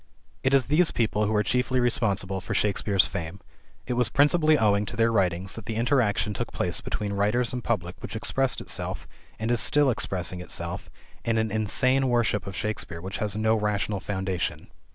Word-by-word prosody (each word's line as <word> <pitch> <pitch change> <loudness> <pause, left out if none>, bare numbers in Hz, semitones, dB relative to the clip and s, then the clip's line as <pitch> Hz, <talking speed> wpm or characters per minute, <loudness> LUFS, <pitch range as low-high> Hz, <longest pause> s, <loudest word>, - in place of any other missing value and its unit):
It 130 +1 +3
is 135 - +3
these 155 +3 +4
people 105 -2 0
who 110 - 0
are 105 - +3
chiefly 125 +4 +1
responsible 100 -6 0
for 90 - -4
Shakespeare's 100 -1 +2
fame. 85 +3 -5 0.5
It 125 - -2
was 125 -1 +1
principally 155 +2 +4
owing 105 -4 +3
to - - -5
their 115 0 +3
writings 95 -3 0
that - - -6
the 110 - -3
interaction 115 -3 +1
took - - -4
place - - 0
between 105 -1 -3
writers 105 +4 +1
and 125 -1 -4
public 90 -6 -2
which - - -7
expressed 135 +4 0
itself, - - -4 0.3
and 110 +2 -2
is 120 - +2
still 145 -3 +4
expressing 90 -5 -2
itself, - - -5 0.3
in 115 -1 0
an 110 -1 0
insane 130 +5 +2
worship 115 -5 +1
of 95 - -6
Shakespeare 105 -4 -4
which 95 +3 -6
has 105 -1 -1
no 110 +1 +2
rational 105 -1 0
foundation. 95 -4 -3
110 Hz, 185 wpm, -26 LUFS, 100-120 Hz, 0.5 s, these